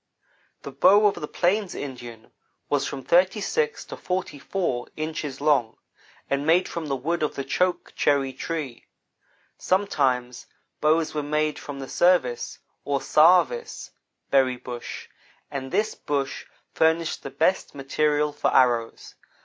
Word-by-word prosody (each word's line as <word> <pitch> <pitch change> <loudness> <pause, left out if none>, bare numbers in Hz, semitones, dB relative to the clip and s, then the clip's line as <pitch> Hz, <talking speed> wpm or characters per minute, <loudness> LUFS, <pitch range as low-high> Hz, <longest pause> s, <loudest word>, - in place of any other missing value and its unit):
The 140 - -7
bow 190 +10 +5
of 205 - +5
the 150 -3 -6
plains 190 +4 0
Indian 120 -5 -8 0.4
was 145 -2 +1
from 135 -1 -6
thirty 185 - +3
six 465 - -1
to - - -8
forty 180 -5 -4
four 135 -7 -2
inches 155 -3 -4
long, 140 -6 +2 0.5
and 140 0 -1
made 165 +4 +3
from 165 -2 -5
the 135 - -1
wood 170 +5 -2
of 150 - -1
the 140 - -3
choke 180 +5 -1
cherry 135 -2 +1
tree. 150 -7 -5 0.7
Sometimes 130 -10 0 0.3
bows 155 +1 +2
were 150 - -1
made 150 +1 -1
from 145 -1 -8
the 135 - -6
service 175 -10 +1 0.3
(or 140 -1 0
sarvice) 180 - +3 0.4
berry 130 -2 +3
bush, 125 -1 -7 0.4
and 135 -1 -5
this 210 +3 +1
bush 140 -2 -3 0.3
furnished 160 0 +1
the - - -6
best 160 +7 0
material 150 +2 0
for 145 - 0
arrows. 120 -3 +1
150 Hz, 140 wpm, -25 LUFS, 135-175 Hz, 0.7 s, bow